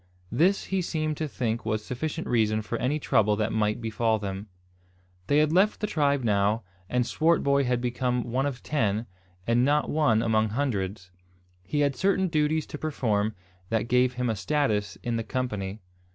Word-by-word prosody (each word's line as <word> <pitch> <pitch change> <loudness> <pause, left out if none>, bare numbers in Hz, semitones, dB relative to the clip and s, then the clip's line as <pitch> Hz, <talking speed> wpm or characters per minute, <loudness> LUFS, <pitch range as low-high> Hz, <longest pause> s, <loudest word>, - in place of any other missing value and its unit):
This 180 +11 +3
he 190 -1 -1
seemed 155 -3 -2
to 155 - -2
think 115 -4 -2
was 110 -1 -2
sufficient 155 +6 -3
reason 110 -2 +1
for 100 - -4
any 140 +4 0
trouble 105 -7 +2
that 105 +1 -1
might 105 +1 +1
befall 110 0 0
them. 100 0 -5 0.8
They 145 - +3
had 155 0 +4
left 195 +4 +3
the - - -1
tribe 145 -8 +1
now, 105 +1 +2 0.3
and 125 -1 +1
Swartboy 140 -2 +2
had 125 -1 +1
become 125 0 -1
one 130 +4 -1
of 130 -3 -5
ten, 110 -6 0 0.4
and 120 +1 +3
not 145 +2 +2
one 120 -8 +3
among 110 -1 +2
hundreds. 100 -7 -2 0.5
He 125 +11 -1
had 140 -2 +2
certain 190 +3 +1
duties 155 -1 +1
to 150 - -8
perform 110 -8 0 0.3
that 115 0 0
gave 125 +1 +3
him 125 0 -2
a 115 - 0
status 105 0 0
in 120 -1 -1
the 115 - -2
company. 105 -5 -3
125 Hz, 175 wpm, -27 LUFS, 110-145 Hz, 0.8 s, had